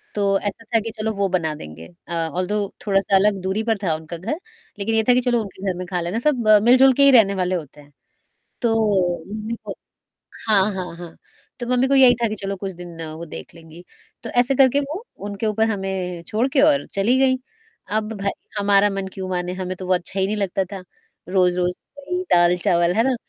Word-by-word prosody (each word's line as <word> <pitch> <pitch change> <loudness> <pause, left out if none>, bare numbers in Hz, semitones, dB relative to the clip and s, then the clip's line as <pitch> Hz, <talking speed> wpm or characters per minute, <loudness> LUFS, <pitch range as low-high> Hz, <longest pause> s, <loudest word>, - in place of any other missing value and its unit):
तो 200 -1 +2
ऐसा 205 +2 -5
था - - +6
कि 225 +1 -5
चलो 220 0 -1
वो 200 0 +1
बना 165 -4 0
देंगे। 80 - -10 0.2
अ, - - -6
ऑल्दो 180 +5 -1 0.3
थोड़ा-सा 195 -1 +2
अलग 195 0 +3
दूरी 190 +4 -1
पर 225 -1 0
था 170 -4 +1
उनका 160 +2 -8
घर, 230 - -4 0.4
लेकिन 220 +3 -1
ये 220 - +3
था - - +8
कि 250 - +3
चलो 240 -2 +1
उनके 200 -2 -9
घर 180 - -7
में 180 - -5
ख़ा 180 -1 -2
लेना, 175 +7 -2
सब 250 -5 0 0.2
मिल-जुल 260 +3 +6
के 280 +2 +3
ही 280 - +7
रहने 200 -3 +4
वाले 180 0 0
होते 150 -3 -7
हैं। 145 0 -20 0.7
तो 230 -3 +2 0.6
मम्मी 215 +2 -4
को - - -5 0.8
हाँ, 205 -3 +5
हाँ, 180 -3 -5
हाँ, 170 -1 -10 0.5
तो 240 - -4
मम्मी 250 +1 +2
को 275 - +3
यही 260 -2 +7
था 230 - +3
कि 215 - -3
चलो 195 0 -2
कुछ 195 0 -5
दिन 175 -2 -9
वो 165 +2 -7
देख - - -10
लेंगी, 165 +1 -14 0.4
तो - - -6
ऐसे 245 +2 +2
करके 270 +1 +4
वो 305 +10 -5 0.2
उनके 205 +2 -4
ऊपर 220 +1 +1
हमें 190 -3 -3
छोड़ 225 +3 0
के 270 0 +2
और 290 -1 +4
चली 220 +6 +2
गई। 265 -1 +3 0.6
अब 215 0 -2
भई, 200 - +1 0.3
हमारा 200 0 +4
मन 195 -1 -4
क्यों 190 -1 -5
माने 180 0 -2
हमें 185 0 -4
तो 185 - -7
बहुत 180 -1 +2
अच्छा 190 +2 -5
ही 190 - +2
नहीं 210 +2 -2
लगता 195 -1 -1
था, 195 -2 -6 0.5
रोज़-रोज़ 180 -1 +2 0.4
वही 360 +1 -1
दाल-चावल, 175 0 +3
है 225 - +4
ना? 265 0 +2
195 Hz, 215 wpm, -21 LUFS, 180-230 Hz, 0.8 s, था